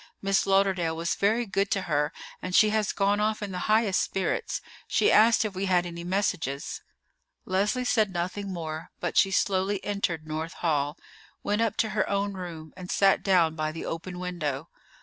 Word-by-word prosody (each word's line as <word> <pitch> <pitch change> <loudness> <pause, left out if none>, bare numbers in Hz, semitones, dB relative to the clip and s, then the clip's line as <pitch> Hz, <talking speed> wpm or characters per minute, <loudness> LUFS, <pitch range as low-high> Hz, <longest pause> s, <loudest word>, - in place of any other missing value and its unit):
Miss 195 0 +1
Lauderdale 190 -4 +2
was 170 +1 0
very 220 +4 +1
good 195 -1 0
to 195 - 0
her, 150 +1 0 0.3
and 185 0 -3
she 215 -1 +6
has 215 -1 +1
gone 200 +1 +1
off 215 0 0
in 200 - -4
the 180 - -4
highest 215 -3 +3
spirits. 195 - -1 0.3
She 420 - +3
asked 225 +1 +5
if 210 - -3
we 195 +1 -2
had 180 -1 +3
any 170 -1 -6
messages." 175 -7 -2 0.6
Leslie 205 +7 0
said 220 -5 +2
nothing 185 +3 -3
more; 160 -2 -5
but 175 - -3
she 195 - +5
slowly 195 +1 +1
entered 180 -6 -2
North 155 +2 -4
Hall, 150 -3 -1 0.5
went 210 +2 0
up 230 -2 0
to 220 - +1
her 210 -1 0
own 200 0 0
room, 170 -4 -8
and 185 -1 -9
sat 195 -1 +3
down 175 -5 +3
by 155 -1 -2
the 160 - -6
open 180 +2 -5
window. 165 -5 -3
190 Hz, 185 wpm, -27 LUFS, 170-205 Hz, 0.6 s, she